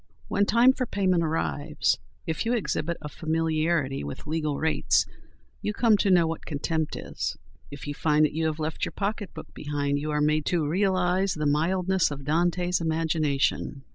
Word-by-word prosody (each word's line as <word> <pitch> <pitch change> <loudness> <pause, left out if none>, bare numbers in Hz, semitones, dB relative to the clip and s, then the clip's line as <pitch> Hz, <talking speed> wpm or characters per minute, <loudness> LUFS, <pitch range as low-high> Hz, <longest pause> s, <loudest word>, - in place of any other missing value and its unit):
When 200 0 +2
time 240 +4 +6
for 255 -1 -2
payment 185 -5 +1
arrives, 155 -1 0 0.3
if 160 -3 -2
you 230 +1 0
exhibit 170 -7 -1
a - - -4
familiarity 160 - 0
with 70 0 -7
legal 150 -1 -1
rates 160 0 +2 0.6
you 210 - -2
come 230 0 +4
to 200 - +1
know 175 -3 +5
what 165 0 -3
contempt 160 +1 -2
is; - - -4 0.3
if 145 - -9
you 145 - -3
find 150 +1 +3
that - - -2
you 160 +1 0
have 155 -1 -2
left 155 0 -3
your - - -1
pocketbook 205 0 -4
behind 145 -1 -1
you 150 +1 -3
are 150 0 0
made 150 0 +1
to 165 -4 +1
realise 185 +1 +1
the 155 -1 -2
mildness 180 +5 +2
of 140 -2 -7
Dante's 175 +3 +1
imagination. 155 -4 0
160 Hz, 170 wpm, -26 LUFS, 150-180 Hz, 0.6 s, time